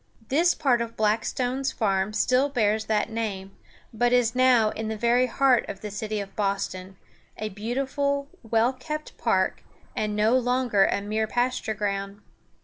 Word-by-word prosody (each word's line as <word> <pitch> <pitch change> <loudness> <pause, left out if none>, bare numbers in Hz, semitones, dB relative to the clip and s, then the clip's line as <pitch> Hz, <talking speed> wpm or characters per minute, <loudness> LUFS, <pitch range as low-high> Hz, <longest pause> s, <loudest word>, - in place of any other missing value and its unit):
This 335 +6 +3
part 250 -5 +2
of 230 0 -5
Blackstone's 245 +5 0
farm 195 -2 0
still 255 +5 +2
bears 220 -5 +1
that 215 +1 0
name, 200 -4 -4 0.4
but 240 +2 +1
it - - +5
is 235 -2 +2
now 250 -4 +4
in 220 0 -5
the 220 0 -3
very 240 +3 +3
heart 260 0 +3
of 195 - -7
the 210 - -6
city 215 +1 -3
of 195 -1 -7
Boston, 195 -2 -3 0.4
a 215 - -3
beautiful, 275 +7 -2
well 225 +2 +1
kept 305 +4 -6
park, - - +1 0.3
and 210 -1 -1
no 215 +3 +3
longer 245 -5 +2
a - - -1
mere 215 +2 -1
pasture 245 -2 -1
ground. 200 -1 -3
225 Hz, 160 wpm, -25 LUFS, 210-255 Hz, 0.4 s, it